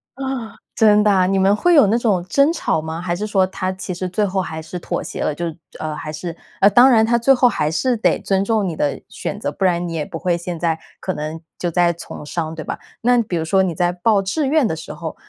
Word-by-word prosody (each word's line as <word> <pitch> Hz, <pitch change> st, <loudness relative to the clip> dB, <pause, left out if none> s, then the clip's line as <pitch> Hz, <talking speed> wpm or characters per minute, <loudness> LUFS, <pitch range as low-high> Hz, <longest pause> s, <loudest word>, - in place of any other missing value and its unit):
啊， 265 Hz, -4 st, -5 dB, 0.2 s
真 210 Hz, -1 st, +5 dB
的 210 Hz, -, +4 dB
啊？ 185 Hz, -2 st, +3 dB
你 195 Hz, +1 st, +1 dB
们 195 Hz, +2 st, +4 dB
会 350 Hz, +11 st, +3 dB
有 285 Hz, -9 st, +7 dB
那 225 Hz, -, +2 dB
种 205 Hz, -7 st, +1 dB
争 280 Hz, -, +3 dB
吵 160 Hz, -, -1 dB
吗？ 160 Hz, +1 st, -5 dB
还 175 Hz, -1 st, -2 dB
是 205 Hz, +4 st, -3 dB
说 195 Hz, -3 st, +3 dB
他 185 Hz, 0 st, -3 dB
其 185 Hz, 0 st, -6 dB
实 180 Hz, +1 st, -4 dB
最 205 Hz, +4 st, 0 dB
后 190 Hz, -1 st, -1 dB
还 160 Hz, -3 st, -5 dB
是 175 Hz, +3 st, -7 dB
妥 -, -, -3 dB
协 -, -, -6 dB
了？ -, -, 0 dB
就 170 Hz, +4 st, -4 dB
是 165 Hz, -2 st, -5 dB, 0.2 s
呃， 155 Hz, -1 st, -3 dB
还 155 Hz, 0 st, -6 dB
是 165 Hz, +2 st, -6 dB, 0.3 s
呃， 200 Hz, -, +7 dB
当 245 Hz, +6 st, +7 dB
然 225 Hz, -3 st, +5 dB
他 235 Hz, +1 st, +2 dB
最 240 Hz, +4 st, +4 dB
后 250 Hz, -1 st, +4 dB
还 150 Hz, -10 st, 0 dB
是 250 Hz, +9 st, +1 dB
得 220 Hz, -, +2 dB
尊 195 Hz, -1 st, 0 dB
重 215 Hz, -1 st, +1 dB
你 170 Hz, -, -3 dB
的 145 Hz, -2 st, -1 dB
选 205 Hz, -, -5 dB
择， -, -, -2 dB
不 -, -, -5 dB
然 175 Hz, -2 st, +2 dB
你 165 Hz, -, -5 dB
也 155 Hz, -2 st, -2 dB
不 165 Hz, -, -7 dB
会 175 Hz, 0 st, 0 dB
现 170 Hz, -1 st, -5 dB
在 165 Hz, -1 st, 0 dB, 0.2 s
可 185 Hz, -, -3 dB
能 155 Hz, +1 st, -5 dB, 0.2 s
就 175 Hz, -, -2 dB
在 175 Hz, +1 st, +3 dB
从 165 Hz, -2 st, -9 dB
商， 160 Hz, +1 st, -3 dB
对 155 Hz, -2 st, -7 dB
吧？ -, -, -5 dB, 0.2 s
那 245 Hz, +1 st, +4 dB
比 190 Hz, -6 st, -3 dB
如 160 Hz, -, -2 dB
说 190 Hz, +4 st, +3 dB
你 180 Hz, -3 st, -1 dB
在 175 Hz, +2 st, +1 dB
报 195 Hz, +3 st, +2 dB
志 235 Hz, +10 st, -1 dB
愿 295 Hz, -3 st, +3 dB
的 160 Hz, -, -2 dB
时 160 Hz, -, -8 dB
候， 165 Hz, -2 st, -6 dB
185 Hz, 290 characters per minute, -20 LUFS, 165-220 Hz, 0.3 s, 有